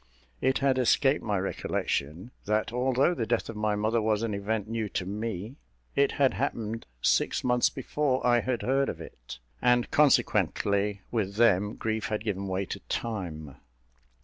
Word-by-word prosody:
It 130 +1 +2
had 135 -2 +2
escaped 135 +3 +3
my 105 -2 0
recollection, 90 - -2
that 110 +2 0
although 130 +6 +2
the 115 -10 -3
death 120 - 0
of 115 - -6
my 105 0 0
mother 110 +2 +1
was 110 0 +1
an 115 -2 -1
event 105 +1 -2
new 110 -1 -2
to 90 - -3
me, 105 +4 -4 0.4
it 140 0 +3
had 135 -2 +3
happened 115 -4 -3 0.2
six - - +2
months 125 -1 +3
before 135 0 -1
I 120 -1 +5
had 120 0 -2
heard 135 +2 +2
of - - -5
it; - - -10 0.2
and, 125 -1 +3
consequently, 105 -8 +2
with 100 -4 -1
them 105 -2 +3
grief 110 0 -2
had 105 -1 -2
given 100 -3 -2
way 95 +1 -1
to - - -6
time. 85 - -4
110 Hz, 165 wpm, -28 LUFS, 100-125 Hz, 0.4 s, I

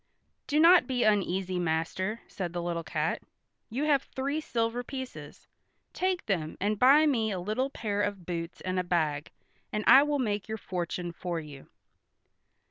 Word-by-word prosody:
"Do 300 +1 +2
not 345 +2 +7
be 255 -2 0
uneasy, 190 -3 +1
master," 175 +6 -1
said 175 -3 -5
the 175 - -2
little 170 -1 -2
cat. - - -1 0.5
"You 255 +6 -2
have 290 -3 +3
three 280 +4 -3
silver 230 -2 -1
pieces. 260 0 -8 0.5
Take 370 -1 -1
them 165 -6 -2
and 205 +1 0
buy 280 +5 +7
me 235 -7 +2
a 190 -3 -2
little 215 +9 -1
pair 205 -6 -2
of 205 -3 -2
boots 170 -1 -5
and 185 0 -1
a - - 0
bag, 155 -5 0 0.4
and 210 - -2
I 270 - +9
will 295 0 +1
make 210 -6 -1
your 220 0 -3
fortune 175 -2 -4
for 170 0 -4
you." 145 -3 -11
205 Hz, 165 wpm, -29 LUFS, 175-260 Hz, 0.5 s, I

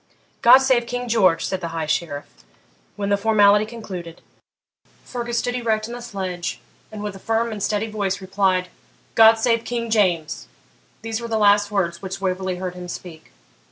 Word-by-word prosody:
'God 245 +2 +9
save 250 -3 +2
King 245 0 -3
George!' 185 -8 +3
said 190 -1 -3
the 170 - -3
High 160 - -1
Sheriff. 150 -2 -2 0.7
When 200 -1 -3
the 200 - +3
formality 210 0 +4
concluded, 185 -8 -8 0.9
Fergus 240 -1 -4
stood 245 0 0
erect 225 -3 0
in 235 - -7
the 245 - -7
sledge, 190 -6 -4 0.3
and, 210 -1 -7
with 205 -2 -4
a - - -10
firm 225 +2 0
and 210 -2 -6
steady 210 +2 0
voice, 200 -3 -2
replied,' 190 -1 0 0.4
God 225 0 +7
save 230 0 +1
King 235 -1 -3
JAMES!' 175 -7 +1 0.6
These 225 0 -3
were 235 - -5
the 225 -1 -1
last 205 -1 +4
words 175 -5 -1
which 190 0 -5
Waverley 185 -1 -2
heard 180 0 -4
him 180 0 -8
speak. 170 - -9
205 Hz, 175 wpm, -22 LUFS, 185-225 Hz, 0.9 s, God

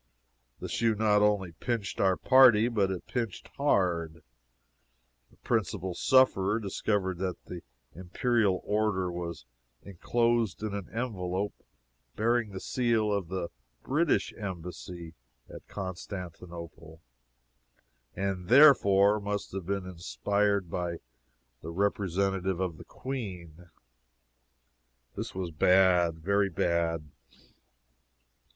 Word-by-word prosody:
The - - -5
shoe 115 -1 +1
not 105 -1 +3
only 105 -4 +2
pinched 110 +2 -3
our 95 -2 +3
party, 125 -4 +6
but 105 -5 +1
it 95 -2 -4
pinched 115 -6 -4
hard; 85 - 0 1.1
a - - -22
principal 95 -5 -1
sufferer 110 -4 +3
discovered 100 -3 -1
that 95 -1 -4
the 90 -1 -8 0.3
imperial 100 +2 0
order 105 -4 0
was 85 -6 -6 0.4
inclosed 115 +2 0
in 110 -2 -3
an 100 -3 -5
envelop 100 -4 -3 0.6
bearing 115 0 +1
the 95 -1 -7
seal 115 -4 0
of 100 -4 -2
the 95 -1 -4 0.3
British 155 +4 +1
Embassy 90 -3 -7 0.3
at - - -12
Constantinople, 85 -4 -8 1.1
and 95 -2 -3
therefore 105 -7 +6
must 100 0 -4
have 95 -2 -6
been 100 -1 -2
inspired 100 +2 -1
by 85 -1 -2 0.6
the 80 - -7
representative 95 0 0
of 90 -4 -2
the - - -12
Queen. 90 - -7 1.5
This - - -5
was 90 -2 -3
bad 90 0 +4
very 100 +4 +1
bad. 85 -4 -1
95 Hz, 105 wpm, -29 LUFS, 90-105 Hz, 1.5 s, party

